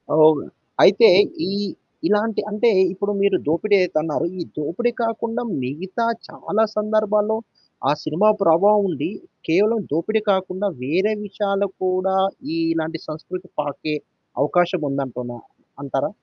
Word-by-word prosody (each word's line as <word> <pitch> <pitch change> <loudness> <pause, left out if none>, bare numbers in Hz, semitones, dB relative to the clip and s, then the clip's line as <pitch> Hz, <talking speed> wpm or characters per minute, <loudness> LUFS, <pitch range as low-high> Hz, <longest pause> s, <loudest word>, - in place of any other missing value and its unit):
అవును. 155 -1 +6 0.4
అయితే 460 - +7 0.4
ఈ - - -2 0.6
ఇలాంటి 210 +1 +1
అంటే 215 +3 +2 0.2
ఇప్పుడు 200 +2 -2
మీరు 200 -2 +3
దోపిడి 185 +7 +2
అయితే 180 -3 0
అన్నారు. 155 +1 -1
ఈ - - -3 0.2
దోపిడి 170 +11 -1
కాకుండా 230 0 -2 0.2
మిగతా 180 - -3 0.2
చాలా 215 +2 -1
సందర్భాల్లో 215 0 +1 0.5
ఆ - - +4
సినిమా 170 +8 +2
ప్రభావం 200 +5 +5
ఉండి, 165 -1 -2 0.4
కేవలం 210 +7 +3
దోపిడి 175 +9 0
కాకుండా 190 +1 -1
వేరే 185 +10 +1
విషయాలు 200 0 -1 0.2
కూడా 185 +1 +1 0.4
ఈ - - -1 0.2
ఇలాంటి 160 0 -3
సంస్కృతి 180 +4 -7
పాకే 145 +1 -3 0.5
అవకాశం 175 +3 +1
ఉందంటున్నా 125 -3 -4 0.4
అంటారా? 135 -1 -1
185 Hz, 120 wpm, -21 LUFS, 155-210 Hz, 0.6 s, అయితే